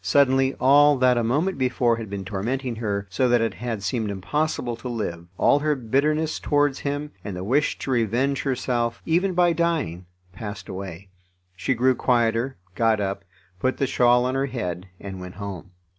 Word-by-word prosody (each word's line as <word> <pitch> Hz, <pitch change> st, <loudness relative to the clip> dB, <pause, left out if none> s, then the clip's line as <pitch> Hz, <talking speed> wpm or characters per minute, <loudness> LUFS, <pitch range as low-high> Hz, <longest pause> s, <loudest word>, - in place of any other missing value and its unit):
Suddenly 135 Hz, +5 st, +3 dB
all 145 Hz, +2 st, +6 dB
that 125 Hz, -1 st, +4 dB
a 120 Hz, -, +1 dB
moment 150 Hz, +10 st, 0 dB
before 125 Hz, -2 st, +2 dB
had 110 Hz, -3 st, -6 dB
been 100 Hz, -1 st, -5 dB
tormenting 115 Hz, +6 st, -3 dB
her, 100 Hz, -3 st, -2 dB
so 125 Hz, +6 st, +2 dB
that 120 Hz, 0 st, +4 dB
it 115 Hz, 0 st, 0 dB
had 115 Hz, -3 st, -4 dB
seemed 105 Hz, +3 st, -1 dB
impossible 120 Hz, +5 st, -1 dB
to 125 Hz, +2 st, -6 dB
live, 85 Hz, -8 st, -4 dB
all 145 Hz, -, +4 dB
her 150 Hz, 0 st, +1 dB
bitterness 150 Hz, +6 st, 0 dB
towards 145 Hz, -2 st, +1 dB
him, 145 Hz, +1 st, -3 dB
and 100 Hz, -3 st, -5 dB
the 90 Hz, -, -4 dB
wish 135 Hz, +9 st, +1 dB
to 135 Hz, -, -4 dB
revenge 125 Hz, +4 st, +1 dB
herself, 120 Hz, -3 st, -1 dB
even 180 Hz, +3 st, +1 dB
by 175 Hz, -1 st, +4 dB
dying, 155 Hz, -, -1 dB, 0.3 s
passed 105 Hz, -1 st, -7 dB
away; 95 Hz, 0 st, -7 dB, 0.5 s
she 130 Hz, +7 st, 0 dB
grew 130 Hz, +3 st, +3 dB
quieter, 120 Hz, 0 st, +1 dB, 0.2 s
got 115 Hz, +1 st, +2 dB
up, 100 Hz, 0 st, -2 dB, 0.4 s
put 130 Hz, +4 st, 0 dB
the 135 Hz, -, +1 dB
shawl 125 Hz, -1 st, +3 dB
on 130 Hz, -, 0 dB
her 135 Hz, +1 st, 0 dB
head, 90 Hz, -8 st, -4 dB
and 95 Hz, -2 st, -7 dB
went 90 Hz, 0 st, -8 dB
home. 100 Hz, -3 st, -7 dB
120 Hz, 180 wpm, -24 LUFS, 100-135 Hz, 0.5 s, all